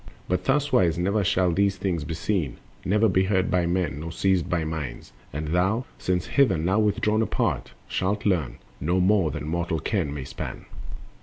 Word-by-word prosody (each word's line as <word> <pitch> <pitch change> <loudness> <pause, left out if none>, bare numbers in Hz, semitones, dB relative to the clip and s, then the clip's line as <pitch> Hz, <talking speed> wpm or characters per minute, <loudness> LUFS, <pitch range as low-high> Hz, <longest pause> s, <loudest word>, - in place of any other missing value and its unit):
But 90 - 0
thuswise 130 - +2
never 100 +4 +1
shall 90 -1 +2
these 100 +2 +1
things 90 -5 -1
be 80 - -4
seen, 85 - -1 0.3
Never 105 +4 +3
be 95 -1 +2
heard 95 -1 +1
by 90 -2 +2
men, 85 -5 -1
nor 85 +2 -5
seized 95 0 +1
by 85 -2 0
mind; 80 -6 -5 0.2
And 75 +1 -4
thou, 95 +9 +1
since 90 -1 0
hither 130 - +3
now 90 +7 +1
withdrawn 105 +1 +2
apart, 110 - -1
Shalt 100 +3 -1
learn—no 80 - -1
more 95 -2 +3
than 75 - -5
mortal 85 0 -1
ken 85 -2 -1
may 70 -2 -5
span. - - -7
90 Hz, 170 wpm, -25 LUFS, 80-100 Hz, 0.3 s, Never